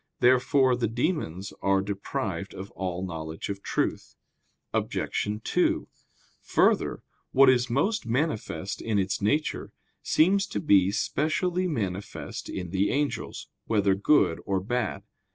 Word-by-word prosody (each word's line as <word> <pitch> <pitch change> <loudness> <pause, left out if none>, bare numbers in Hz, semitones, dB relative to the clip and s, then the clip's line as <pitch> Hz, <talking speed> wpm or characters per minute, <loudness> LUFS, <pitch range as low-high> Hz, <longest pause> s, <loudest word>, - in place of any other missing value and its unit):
Therefore 130 +1 +4
the 120 -1 0
demons 115 - -2
are 95 0 +3
deprived 100 0 -3
of 95 +1 -8
all 90 0 -3
knowledge 80 -1 -6
of 100 -1 -4
truth. - - -2 0.6
Obj. - - -1 0.2
2: - - +1 0.5
Further, - - +2 0.3
what 135 0 +7
is 125 -1 +1
most 160 - 0
manifest 115 - -2
in 110 -2 0
its 95 0 0
nature, 145 +10 0 0.3
seems 195 +5 +3
to 105 - -3
be 95 -1 +4
specially 175 - 0
manifest 100 - -4
to 95 - -4
the 95 +3 0
angels, 145 0 -2 0.2
whether 100 -3 +2
good 100 - +3
or 95 -1 0
bad. 105 -1 -2
105 Hz, 125 wpm, -27 LUFS, 95-135 Hz, 0.6 s, what